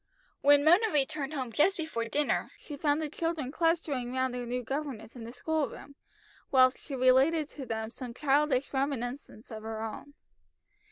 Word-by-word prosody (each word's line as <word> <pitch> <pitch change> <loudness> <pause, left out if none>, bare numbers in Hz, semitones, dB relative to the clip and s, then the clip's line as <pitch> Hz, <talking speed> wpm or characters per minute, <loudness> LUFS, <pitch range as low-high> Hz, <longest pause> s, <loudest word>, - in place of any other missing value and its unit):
When 285 0 +6
Mona 360 +8 +5
returned 295 0 -1
home 255 -4 -3
just 335 - +3
before 315 -9 -3
dinner, 290 +5 0
she 295 - -9
found 290 +1 +1
the - - -1
children 310 -3 -3
clustering 310 -6 0
round 260 -1 0
their 245 -1 -4
new 250 +1 -2
governess 265 -4 -5
in 235 -2 -8
the 230 - -7
school 310 +4 -1
room, 280 - -11 0.6
whilst 255 -1 +5
she 280 - -7
related 265 +5 +4
to 270 -4 -8
them 220 -1 -3
some 245 -2 -7
childish 285 -1 +1
reminiscence 265 -3 -3
of 220 -1 -6
her 220 0 -5
own. 285 +6 -7
270 Hz, 170 wpm, -30 LUFS, 245-300 Hz, 0.6 s, When